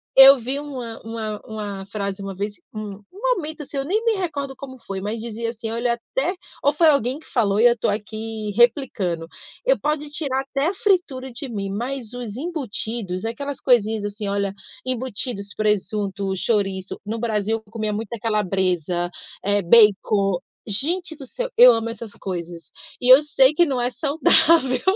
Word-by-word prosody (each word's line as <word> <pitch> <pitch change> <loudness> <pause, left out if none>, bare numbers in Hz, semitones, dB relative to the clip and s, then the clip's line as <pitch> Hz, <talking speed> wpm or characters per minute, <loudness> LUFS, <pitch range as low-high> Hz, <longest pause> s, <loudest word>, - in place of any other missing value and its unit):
eu 270 0 +10
vi 255 +4 -1
uma 255 -6 -7
uma 220 -2 -5
uma 205 -3 -6
frase 200 -1 -4
uma 195 0 -5
vez, 205 +2 -3 0.2
um 215 -2 -5 0.2
um - - 0
momento, 315 -4 -5
assim, 285 - -10
eu 275 - 0
nem 405 +8 0
me 460 - +3
recordo 295 -9 -3
como 260 -1 -10
foi, 195 -4 -6
mas 210 +3 -3
dizia 230 0 -4
assim: 225 -1 -6
“Olha, 235 +1 0
até“, 265 +8 -2 0.3
ou 285 - +4
foi 320 +3 +3
alguém 280 -2 +2
que 315 - -18
falou 210 -5 +1
e 230 - +5
eu 240 - +7
estou 235 - -1
aqui 215 +1 -4
replicando. 215 - +2 0.4
“E - - +4
pode 300 0 -2
tirar 285 -4 0
até 275 +2 -2
a 360 - 0
fritura 360 - 0
de 250 +3 -5
mim, 200 -4 -4
mas 240 +3 -4
os 240 -3 -6
embutidos”, 230 - -3
aquelas 280 +5 -4
coisinhas, 220 -4 +2
assim, 205 0 -4
olha, 200 -1 -1 0.3
embutidos, 245 -4 -2
presunto, 200 -2 -1
chouriço. 195 -2 -1
No 220 +2 -3
Brasil, 220 -1 0
eu 205 - -24
comia 215 -2 -2
muita 220 +2 -4
calabresa, 185 -5 0 0.3
eh, 205 +1 +2
bacon. 200 -1 +4 0.3
Gente 330 - 0
do 275 - -9
céu! - - -4
Eu 245 0 +9
amo 225 0 -2
essas 230 -1 -8
coisas 175 -3 -7 0.3
e 250 0 +7
eu 265 - +8
sei 295 -2 +4
que 345 +3 +4
não 265 -5 -1
é 245 +1 0
saudável. 285 0 +4
230 Hz, 175 wpm, -22 LUFS, 205-275 Hz, 0.4 s, eu